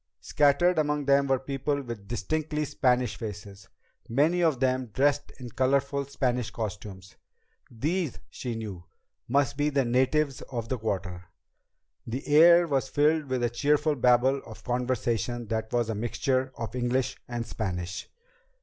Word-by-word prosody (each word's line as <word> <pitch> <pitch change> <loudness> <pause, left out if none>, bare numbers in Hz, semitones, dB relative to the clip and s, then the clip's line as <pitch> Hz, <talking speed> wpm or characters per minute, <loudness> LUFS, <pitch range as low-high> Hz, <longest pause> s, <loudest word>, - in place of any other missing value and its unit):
Scattered 150 +4 +3
among 150 -1 0
them 140 0 +4
were 135 -1 +3
people 135 +2 -2
with 115 -5 -8
distinctly 150 +6 -2
Spanish 125 -5 +1
faces, 100 -3 -8 0.4
many 155 +9 +2
of 160 -7 +2
them 130 -1 +1
dressed 145 +6 +1
in 125 -1 -7
colorful 140 +2 +1
Spanish 125 -3 -1
costumes. 100 -3 -7 0.5
These, 155 +6 -2
she 120 -3 -5
knew, 105 -6 -6 0.4
must 140 +1 +1
be 145 0 +2
the 140 -3 +1
natives 130 +3 +1
of 115 -2 -4
the 130 - -2
Quarter. 95 -4 -3 0.8
The 125 +4 -4
air 170 +4 +7
was 135 -3 0
filled 155 +1 +2
with 130 -2 -1
a 120 - +2
cheerful 150 +4 +2
babble 125 +2 +3
of 110 -1 -12
conversation 120 -1 -1
that 110 -1 -2
was 120 -2 +1
a 110 - -1
mixture 130 +4 -1
of 115 -2 -5
English 125 +1 0
and 120 -1 -4
Spanish. 90 -6 -4
130 Hz, 145 wpm, -27 LUFS, 115-145 Hz, 0.8 s, air